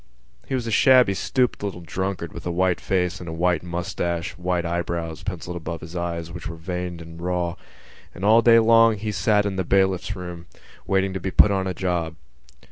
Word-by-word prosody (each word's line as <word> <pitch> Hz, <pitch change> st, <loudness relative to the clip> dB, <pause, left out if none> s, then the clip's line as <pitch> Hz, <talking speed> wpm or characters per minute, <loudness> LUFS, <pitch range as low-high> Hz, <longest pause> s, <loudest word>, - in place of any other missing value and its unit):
He 135 Hz, -, -1 dB
was 125 Hz, -2 st, -2 dB
a 115 Hz, -, -3 dB
shabby 125 Hz, -2 st, +5 dB
stooped 125 Hz, +6 st, 0 dB
little 100 Hz, -3 st, -4 dB
drunkard 95 Hz, -1 st, -4 dB
with -, -, -7 dB
a -, -, -1 dB
white 90 Hz, 0 st, +1 dB
face 90 Hz, -1 st, 0 dB
and 85 Hz, -, -7 dB
a -, -, -4 dB
white 85 Hz, 0 st, +1 dB
moustache 85 Hz, -1 st, -3 dB
and 90 Hz, -, -16 dB
white 90 Hz, -1 st, 0 dB
eyebrows, 85 Hz, -1 st, -3 dB
pencilled 90 Hz, -2 st, -5 dB
above 85 Hz, 0 st, -6 dB
his 80 Hz, +1 st, -10 dB
little 85 Hz, -1 st, -2 dB
eyes, 85 Hz, -1 st, -5 dB
which 90 Hz, 0 st, -7 dB
were 85 Hz, -, -6 dB
pink 80 Hz, 0 st, -17 dB
veined 90 Hz, -2 st, -4 dB
and 85 Hz, 0 st, -11 dB
raw; 90 Hz, -1 st, -1 dB, 0.6 s
and 95 Hz, -, -4 dB
all 110 Hz, +2 st, +6 dB
day 115 Hz, 0 st, +6 dB
long 115 Hz, -1 st, +5 dB
he 105 Hz, +1 st, -3 dB
sat 105 Hz, +2 st, +2 dB
in 100 Hz, -2 st, -2 dB
the 95 Hz, -, 0 dB
bailiff's 95 Hz, +1 st, +1 dB
room, 90 Hz, -2 st, -8 dB, 0.4 s
waiting 95 Hz, 0 st, +1 dB
to 95 Hz, -, -3 dB
be 95 Hz, -, -3 dB
put 100 Hz, -, +5 dB
on 95 Hz, -1 st, 0 dB
a 90 Hz, -, -3 dB
job. 85 Hz, -3 st, -2 dB
90 Hz, 215 wpm, -23 LUFS, 85-100 Hz, 0.6 s, all